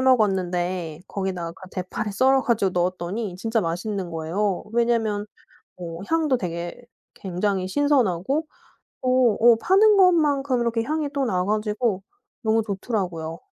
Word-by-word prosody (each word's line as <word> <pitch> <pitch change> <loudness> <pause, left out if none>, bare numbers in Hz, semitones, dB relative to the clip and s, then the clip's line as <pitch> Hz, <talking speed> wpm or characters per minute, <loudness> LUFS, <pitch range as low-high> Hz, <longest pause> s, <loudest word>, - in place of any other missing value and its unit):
먹었는데 185 -8 +1
거기다가 185 -4 -3
그 185 +2 -13
대파를 205 +4 -4
썰어 265 +6 +3
가지고 210 -5 +1
넣었더니 180 +3 -2
진짜 225 +4 0
맛있는 180 +2 -3
거예요. 175 +5 -2
왜냐면 225 -3 +1 0.5
어 170 -2 -7
향도 320 -4 +2
되게 170 -2 -4 0.4
굉장히 190 0 -2
신선하고 275 - +1 0.6
또 255 -3 +3
어 235 0 +7
파는 415 +3 +5
것만큼 290 -8 +3
이렇게 230 -1 0
향이 300 +3 -2
또 280 -1 0
나 180 -5 0
가지고 210 -1 0 0.4
너무 225 -1 +2
좋더라고요. 185 -6 -3
210 Hz, 300 characters per minute, -24 LUFS, 180-250 Hz, 0.6 s, 어